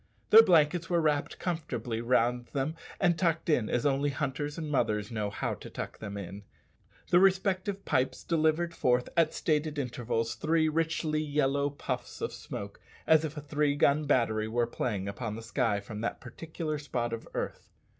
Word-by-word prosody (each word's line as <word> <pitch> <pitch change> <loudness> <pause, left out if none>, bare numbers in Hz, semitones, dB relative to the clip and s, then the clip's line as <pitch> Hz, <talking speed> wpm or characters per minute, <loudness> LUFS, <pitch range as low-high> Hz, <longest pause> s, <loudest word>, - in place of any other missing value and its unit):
Their 225 - +11
blankets 170 -4 +3
were 175 -1 +3
wrapped 150 -3 0
comfortably 125 -10 -3
round 120 0 +1
them, 145 +3 -1 0.2
and 175 -3 +2
tucked 165 -2 +1
in 120 -7 +2
as 120 - 0
only 140 +1 +2
hunters 145 +1 -3
and 155 -2 -4
mothers 105 -6 0
know 105 -2 -2
how 100 - -2
to - - -9
tuck - - -6
them 100 -1 -6
in. 100 +1 -7 0.7
Their 175 - +7
respective 190 +1 +2
pipes 130 0 0
delivered 165 +1 +1
forth, 125 -4 +1
at 165 -2 +4
stated 150 -1 0
intervals, 120 -3 -2
three 160 0 +1
richly 160 -1 0
yellow 145 -1 +1
puffs 130 -3 -5
of - - -3
smoke, 100 0 -7 0.3
as 160 -1 +5
if 155 -1 -4
a - - -4
three 150 0 0
gun 145 +1 +3
battery 115 -6 +2
were 120 +2 +1
playing 105 -4 -3
upon 105 +2 -4
the 115 - -8
sky 115 -3 0
from 105 +1 -7
that 115 - -2
particular 155 +4 -5
spot 120 -5 -2
of 115 - -6
earth. - - -4
145 Hz, 175 wpm, -30 LUFS, 120-160 Hz, 0.7 s, Their